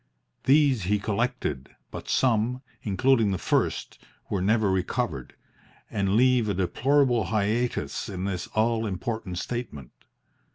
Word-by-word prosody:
These 135 - +4
he 105 +3 +2
collected, 100 - -2 0.2
but - - -8
some, 125 +1 +1 0.2
including 115 +2 +2
the 95 - 0
first, - - -1 0.3
were 100 - 0
never 105 +1 +2
recovered, 95 - -2 0.6
and 100 -1 0
leave 125 -2 +4
a 100 - 0
deplorable 120 +6 +2
hiatus 110 - -1
in 95 -1 -4
this 90 -3 -3
all 115 0 +1
important 100 -1 -4
statement. 95 - -5
110 Hz, 120 wpm, -26 LUFS, 95-120 Hz, 0.6 s, These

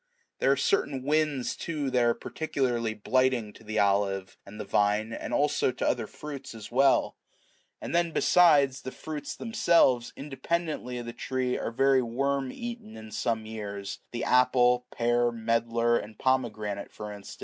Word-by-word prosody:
There - - +3
are - - +4
certain 150 - 0
winds, 150 -3 0
too, 150 -5 -3
that 125 -1 +3
are 120 0 +3
particularly 120 -7 -2
blighting 125 -1 +1
to - - -16
the 110 0 -4
olive 100 -1 +1
and 105 +2 -10
the - - -4
vine, 105 +2 +1
as - - -5
also 145 -2 +2
to 125 - -2
other 115 -3 0
fruits 140 -5 -8
as 110 0 -9
well: 135 +2 +3 0.6
and - - -6
then 170 0 +2
besides, 145 -7 +4
the 130 - -6
fruits 155 +1 -6
themselves, 170 - +2
independently 150 -2 -3
of 120 - -5
the 120 - -6
tree, 130 0 -2
are - - -2
very 135 +2 +3
much 120 - -4
worm 140 0 0
eaten 235 -2 -7
in 110 0 -10
some 110 +1 -1
years, 100 -2 -6
the 120 - -4
apple, 125 -1 +3
pear, 120 0 +1
medlar, 115 +1 +1
and 105 +1 -10
pomegranate 110 -6 -1
for 105 0 -7
instance. 100 -1 -10
125 Hz, 165 wpm, -28 LUFS, 110-140 Hz, 0.6 s, are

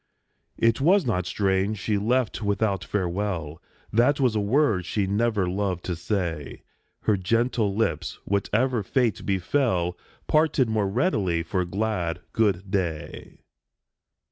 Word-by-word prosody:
It 115 +2 +2
was 185 +6 +4
not 90 -7 0
strange 95 +2 0
she 105 +1 -1
left 120 +3 0
without 100 -2 0
farewell; 90 -5 -2 0.3
That 125 +6 +3
was 125 -5 +2
a - - +2
word 105 -2 +2
she 95 +3 -1
never 105 0 +1
loved 95 -1 -2
to 90 - -2
say. 85 -5 -3 0.4
Her 105 - +2
gentle 115 +2 0
lips, 110 +1 -1
whatever 110 +5 +1
fate 115 +3 0
befell, 95 -2 +1 0.3
Parted 155 -4 +3
more 105 -3 +1
readily 95 - +1
for 90 +2 -1
glad 90 -3 -2
" - - -42
Good 100 -3 +1
day." 85 -6 -3
100 Hz, 130 wpm, -25 LUFS, 90-115 Hz, 0.4 s, was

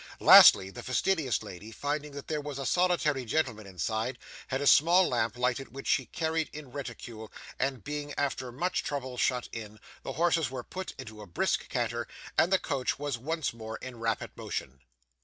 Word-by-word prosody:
Lastly, 95 0 +9
the - - -8
fastidious 135 -2 0
lady, 105 +1 -9
finding 145 +4 -3
there 150 +2 -4
was 145 -1 -6
a 135 - -4
solitary 170 -5 +2
gentleman 115 -5 -1
inside, 110 +6 -2 0.3
had 130 - -1
a 145 - -2
small 175 +6 +6
lamp 115 -2 0
lighted 125 +2 -1
which 135 - -7
she 130 -4 +2
carried 160 +1 -1
in 145 -4 -9
reticule, 120 -5 -7 0.3
and 135 -3 -1
being 145 0 -4
after 130 -3 -1
much 175 +9 -1
trouble 130 -3 -4
shut 125 0 0
in, 110 -2 -8 0.2
the - - -5
horses 165 -1 +2
were 130 -2 -5
put 190 +7 -7
into 110 -5 -9
a 105 - -10
brisk 85 - -1
canter - - -1 0.3
and 175 - +3
the 190 - +6
coach 140 -8 -2
was 140 -4 -3
once 160 +2 -2
more 110 -1 -7
in 125 -2 -9
rapid 115 -1 -2
motion. 65 +2 -5
135 Hz, 175 wpm, -29 LUFS, 115-150 Hz, 0.3 s, Lastly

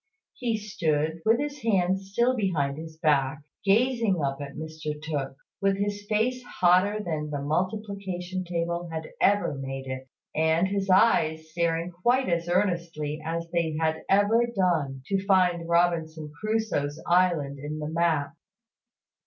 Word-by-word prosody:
He 235 -3 -1
stood, 160 -6 -1
with 225 +2 +5
his 290 -1 -4
hands 190 -3 +1
still 240 +5 +2
behind 155 - 0
his 160 -1 -9
back, 145 -2 +1 0.2
gazing 225 -1 +2
up 140 -1 -2
at 140 -1 -7
Mr 155 -1 -5
Tooke, 145 -3 -3 0.3
with 195 0 +2
his 205 0 -3
face 245 +4 +1
hotter 185 0 +3
than 155 -4 -3
the 145 -1 -3
multiplication 185 +3 -2
table 170 0 -2
had 160 -1 -5
ever 205 -3 +3
made 135 -1 -5
it, 130 0 -6 0.3
and 160 +3 +2
his 195 0 -2
eyes 160 -6 +3
staring 170 +1 0
quite 240 +9 +1
as 170 0 0
earnestly 170 -5 -1
as 165 +1 -3
they 165 -3 0
had 160 0 0
ever 205 +4 +4
done 165 - 0
to 195 +3 -1
find 180 -4 +2
Robinson 165 -3 +1
Crusoe's 215 -10 -1
island 170 -6 +2
in 150 +2 -5
the 150 -1 -4
map. 160 -2 +1
170 Hz, 145 wpm, -27 LUFS, 155-200 Hz, 0.3 s, with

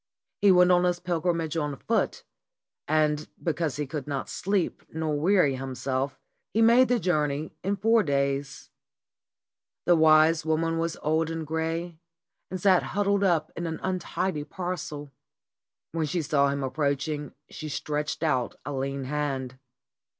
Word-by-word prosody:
He 200 - +6
went 180 0 +6
on 180 0 +4
his 175 -1 +1
pilgrimage 170 -2 -1
on 150 -3 -1
foot, - - -1 0.6
and 150 0 +1 0.2
because 160 -4 -1
he 150 - -2
could 140 0 -5
not 140 -2 -3
sleep 195 -2 -1
nor 160 -1 -1
weary 175 -4 +3
himself 130 +1 -3 0.4
he - - +3
made 235 +3 +6
the 245 -1 +2
journey 150 -5 0
in 195 +2 0
four 225 +3 +3
days. 140 -3 -1 1.1
The 175 - +5
wise 155 0 +5
woman 165 +1 0
was 165 0 -2
old 160 +1 +1
and 165 -1 -4
gray, 160 +2 -3 0.5
and 185 - -4
sat 185 -1 +5
hud 205 +1 -2
dled 200 0 +2
up 165 -5 +2
in 170 0 -3
an 160 -1 -4
untidy 185 -3 -2
parcel. 155 -4 -5 0.8
When 160 -1 -1
she 170 +2 -1
saw 140 -1 +2
him 140 0 -2
ap 130 - -3
proaching 145 0 -1 0.2
she 155 - -6
stretched 150 +2 -3
out 130 -7 0
a 145 - -4
lean 135 0 -2
hand. 135 -2 -3
155 Hz, 150 wpm, -27 LUFS, 145-175 Hz, 1.1 s, He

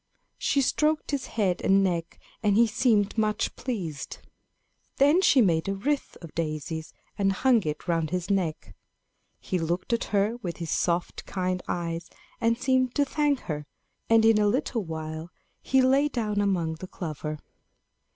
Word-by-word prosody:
She 280 - +2
stroked 300 +4 +1
his 280 -2 -2
head 195 -5 0
and 195 0 +4
neck, 170 -3 -2 0.2
and 205 -3 +3
he 235 +2 +6
seemed 220 -2 +2
much 215 -1 0
pleased. 180 - -4 0.8
Then 290 +6 +5
she 285 -8 +5
made 165 -6 +2
a 195 - -1
wreath 280 +8 -2
of 165 - -10
daisies, 160 0 -3 0.3
and 195 -1 +3
hung 240 +4 +3
it 150 0 -4
round 165 -2 +1
his 180 +1 -2
neck. 170 - -1 0.7
He 185 - -2
looked 175 +7 -1
at 235 - 0
her 210 +3 +1
with 180 -8 -5
his 165 -3 -4
soft 175 0 -1
kind 185 -1 -1
eyes, 170 -1 -3 0.3
and 230 0 +2
seemed 255 0 +1
to 285 - +3
thank 290 -1 +1
her; 150 -2 -5 0.4
and 225 -1 +5
in 225 -1 +5
a 210 - +3
little 235 0 0
while, 160 0 -6 0.3
he 265 0 +3
lay 270 +3 +4
down 215 -7 -1
among 170 -5 0
the 185 - -7
clover. 155 -4 -5
195 Hz, 160 wpm, -27 LUFS, 170-240 Hz, 0.8 s, he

